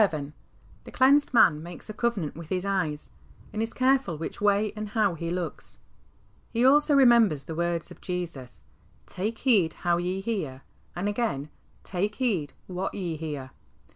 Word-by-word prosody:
The 155 -8 +1 0.6
clea7ised 280 +3 +4
man 175 -11 +5
makes 170 +1 -9
a 215 - -6
covenant 210 -9 -1
with 165 -1 -9
his 185 0 -1
eyes, 175 -7 -2 0.4
and 215 - -2
is 225 +1 +1
careful 260 - +2
which 165 - -6
way 205 +1 +3
a77d 215 0 -6
how 210 -5 +2
he 165 0 -4
looks. 175 -2 -5 0.7
He 235 +2 +1
also 290 +2 +5
remembers 235 - +5
the 160 - -6
words 170 0 -2
of - - -13
Jesus, 170 -9 -6 0.4
"Take 210 +5 -3
heed 205 -11 +3
how 175 -1 +3
ye 180 +2 -2
hear," 165 - -3 0.3
and 180 +3 -2
again, 205 - -1 0.2
" - - -34
Take 200 +3 -2
\\t^di 200 - 0 0.2
What 185 +1 -4
ye 175 -5 -3
hear." 145 -4 -5
185 Hz, 165 wpm, -27 LUFS, 160-225 Hz, 0.7 s, man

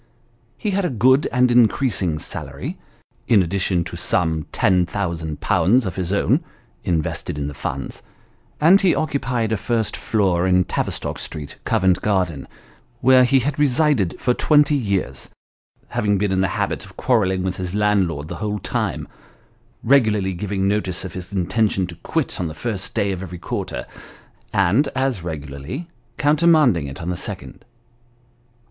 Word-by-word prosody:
He 210 - -2
had 200 +1 0
a 180 - +1
good 130 +3 +3
and 125 0 +3
increasing 110 - +2
salary, - - -6 0.5
in 105 -5 +5
addition 90 0 0
to - - -7
some 80 -2 0
10,OOOZ. 90 - +1
of 95 - -4
his 90 -1 -2
own 125 - +2 0.4
(invested 80 -4 -2
in 70 - -2
the 75 - -4
funds), - - -5 0.6
and 175 +6 +6
he 185 -3 +3
occupied 125 -7 -1
a 110 - +1
first 115 +1 -1
floor 95 -5 +1
in 90 0 +4
Tavistock - - -3
Street, 75 -3 -7
Covent 95 -5 +2
Garden, 90 -8 0 0.5
where 130 0 +6
he 135 +1 +3
had 145 +3 -2
resided 140 - +2
for 125 - +2
twenty 150 +2 +4
years, 100 - -1 0.6
having 105 -1 +1
been 100 0 0
in 95 0 +2
the 95 - +2
habit - - -1
of - - -15
quarrelling 95 -7 +1
with 95 0 -2
his 90 +1 -4
landlord 95 -8 +1
the 85 - -6
whole 105 +1 -2
time: - - -2 0.8
regularly 110 -7 +3
giving 95 +1 -2
notice 95 -3 -1
of 90 - -7
his 90 +1 -7
inten 100 +3 +1
tion 95 -2 -1
to 90 -1 -9
quit - - -2
on 90 - -1
the 80 - -7
first 100 +1 -4
day 100 -1 +1
of 95 -1 -4
every 90 -2 -7
quarter, - - -4 0.7
and 100 +8 +3
as 130 -6 0
regularly 75 - -6 0.3
counter 150 +3 +2
manding 125 - +4
it 70 - -8
on 90 - -2
the - - -2
second. - - -6
100 Hz, 155 wpm, -21 LUFS, 90-125 Hz, 0.8 s, and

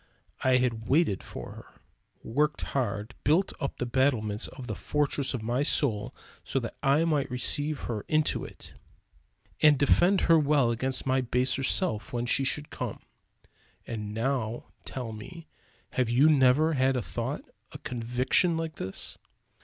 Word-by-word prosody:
I 130 -1 +4
had 115 -3 -1
waited 145 - +2
for - - -8
her; - - -14 0.4
worked 150 +6 0
hard, 110 -4 -2
built 165 +7 +2
up 140 - -3
the 125 - -2
battlements 120 -4 +1
and 130 - -7
the - - -4
fortress 145 -2 -1
of 115 - -5
my 120 +4 0
soul 115 -7 +1 0.3
so 135 - -1
that 115 -3 -6
I 145 +4 +3
might 150 -4 0
receive 145 +4 0
her 110 -4 -4
into 155 -1 +1
it; - - -10 0.9
and 150 -2 +6
defend 175 +7 +4
her 165 -2 +5
well 145 -5 +3
against 130 +3 -1
my 130 0 +2
baser 125 +2 0
self 135 - 0
when 120 0 -1
she 130 +2 +3
should 150 +2 +1
come. - - -5 0.8
And 105 -2 -5
now 115 0 -2
tell 125 -4 -5
me 160 +11 -9 0.5
have 125 -3 0
you 135 +6 +5
never 145 +3 +4
had 130 -1 +2
a 125 - -1
thought, - - -4 0.3
a - - -8
conviction 125 +8 +1
like 160 -1 -4
this? 95 +1 -6
130 Hz, 155 wpm, -28 LUFS, 120-150 Hz, 0.9 s, and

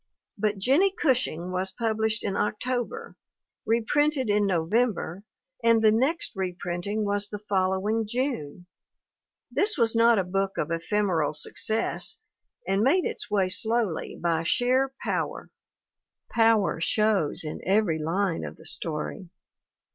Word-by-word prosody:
But 210 0 -1
Jennie 295 - +3
Gush 260 -5 +3
ing 170 +3 -6
was 185 +1 -1
published 220 0 -1
in 195 -2 -2
October, 255 - -2 0.5
reprinted 255 +3 +1
in 205 0 +2
Novem 200 +7 +2
ber 180 +5 -6 0.4
and 230 -1 +5
the 215 - +6
next 265 +10 +1
reprinting 185 +2 -3
was 205 0 -1
the 210 - -5
following 205 +2 0
June! 215 - -3 0.9
This 415 -2 +1
was 230 -2 +2
not 230 0 +5
a 195 - +2
book 195 +2 -2
of 155 - -2
ephemeral 165 -3 0
success 215 +8 -1 0.5
and 195 +1 +1
made 300 +10 +3
its - - -3
way 200 -3 +2
slowly 220 -1 -1
by 165 -1 0
sheer 255 +9 +2
power. - - -3 0.8
Power 225 -6 +3
shows 195 -5 +1
in 155 - -6
every 190 -4 +2
line 165 +3 -1
of - - -6
the - - -16
story. 165 +4 -1
210 Hz, 130 wpm, -26 LUFS, 185-230 Hz, 0.9 s, the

